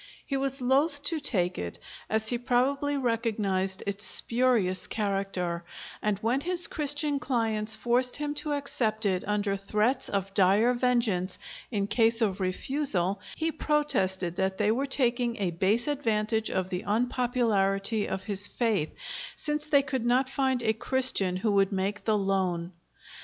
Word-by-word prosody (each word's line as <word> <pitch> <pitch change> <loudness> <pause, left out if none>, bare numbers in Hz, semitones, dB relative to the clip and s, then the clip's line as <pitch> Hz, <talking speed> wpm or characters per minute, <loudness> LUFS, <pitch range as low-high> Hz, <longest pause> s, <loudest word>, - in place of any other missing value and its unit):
He 275 - -3
was 270 -1 0
loath 285 +3 +1
to 315 +2 +3
take 185 -11 +1
it, 85 -1 -5 0.3
as 220 0 +3
he 240 - +2
probably 275 +4 0
recognized 210 -6 -1
its 200 +1 -2
spurious 230 -7 +3
character, 195 -4 -3 0.4
and 210 -2 0
when 245 +5 0
his 355 +1 +2
Christian 290 -1 +1
clients 220 -5 +1
forced 245 +3 +2
him 295 0 -3
to 295 0 -2
accept 225 -7 -2
it 185 -2 0
under 205 -1 -1
threats 215 +6 -1
of 195 -1 -3
dire 205 +5 +3
vengeance 235 -7 0 0.3
in 205 -4 -1
case 225 +2 +2
of 205 -5 0
refusal, 195 -1 0 0.2
he 325 0 -2
protested 190 - 0
that 190 0 -1
they 210 0 +1
were 265 +5 -1
taking 245 -3 +1
a 190 -4 -1
base 195 - +1
advantage 220 -6 0
of 185 0 -3
the 180 0 -2
unpopularity 220 -3 0
of 190 - -4
his 205 -1 +2
faith, 215 -10 -1 0.5
since 300 0 -2
they 280 -2 +4
could 265 -3 -3
not 250 +2 +2
find 265 -3 0
a 220 -1 +2
Christian 225 -6 +2
who 205 +4 -1
would 195 0 +2
make 195 +1 -3
the 215 -1 +2
loan. 185 -3 -1
220 Hz, 150 wpm, -27 LUFS, 195-260 Hz, 0.5 s, they